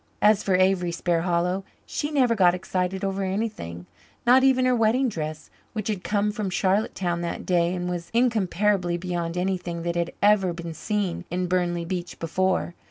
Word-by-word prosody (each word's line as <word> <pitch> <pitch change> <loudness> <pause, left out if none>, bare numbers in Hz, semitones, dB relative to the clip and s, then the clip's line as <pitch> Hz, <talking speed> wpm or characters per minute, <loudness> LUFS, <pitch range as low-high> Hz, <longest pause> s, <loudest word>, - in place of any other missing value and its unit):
As 210 0 +4
for 190 -3 +1
Avery 185 -1 +2
Sparhallow, 175 +2 0 0.2
she 295 - -3
never 260 -6 +3
got 180 -5 +4
excited 185 +1 -2
over 195 0 -2
anything 190 - -3 0.4
not 255 +2 +6
even 260 -1 +4
her 255 0 +3
wedding 240 +3 +2
dress, 155 -5 -5 0.2
which 215 -2 -3
had 200 -4 -2
come 210 0 +1
from 210 -2 -3
Charlottetown 185 -2 0
that 170 0 -4
day, 175 0 +2
and 180 0 -3
was 175 -1 -4
incomparably 210 -6 +1
beyond 175 -1 -3
anything 180 -2 -2
that 170 0 -1
had 170 0 -1
ever 200 -3 +4
been 170 -1 -6
seen 200 -1 -2
in 180 +1 -1
Burnley 175 -1 0
Beach 175 0 -4
before. 185 +2 0
185 Hz, 165 wpm, -25 LUFS, 175-210 Hz, 0.4 s, not